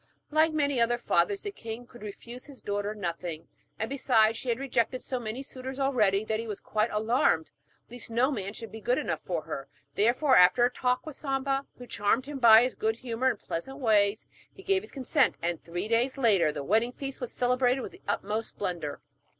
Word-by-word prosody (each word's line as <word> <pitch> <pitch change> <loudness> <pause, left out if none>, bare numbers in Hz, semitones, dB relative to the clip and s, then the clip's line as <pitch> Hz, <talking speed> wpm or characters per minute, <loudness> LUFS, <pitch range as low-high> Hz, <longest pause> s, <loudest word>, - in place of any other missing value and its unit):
Like 315 +1 +4
many 285 -5 +1
other 240 +1 +3
fathers, 400 - +1
the 410 - -3
king 230 - -7
could 240 0 -15
refuse 235 +4 -8
his 280 -3 -12
daughter 205 +1 -2
nothing, 170 -4 -4 0.3
and 220 - -2
besides, 230 -5 +3
she 245 - -5
had 230 - +1
rejected 255 -1 -1
so 255 - -3
many 235 +3 -5
suitors 260 0 -7
already 215 -7 +2
that 220 0 -1
he 230 - -5
was 210 -2 -5
quite 215 +1 0
alarmed 215 -7 +1 0.4
lest 245 0 -7
no 240 +5 +2
man 200 -6 -3
should 225 0 -8
be 220 - -9
good 245 +4 +1
enough - - -2
for 170 -4 -3
her. 135 0 -6 0.3
Therefore, 250 - +3
after 180 +7 +6
a 245 - +1
talk 250 +1 0
with 310 -3 -7
Samba, 275 -1 -1
who 250 - -9
charmed 225 +3 0
him 285 -1 -6
by 230 -1 +8
his 255 - 0
good 220 0 -1
humour 245 +2 -1
and 240 - -2
pleasant 265 +12 -5
ways, 210 -5 +2 0.3
he 385 - -15
gave 390 -1 +2
his - - -10
consent, 270 0 +2
and 170 0 -2
three 175 +4 -4
days 240 +4 +1
later 205 - +4
the 145 -1 -5
wedding 225 - +2
feast 275 0 -6
was 250 - -4
celebrated 250 +1 +1
with - - -6
the - - -16
utmost 215 +3 -2
splendour. 175 -7 -4
235 Hz, 205 wpm, -28 LUFS, 210-260 Hz, 0.4 s, by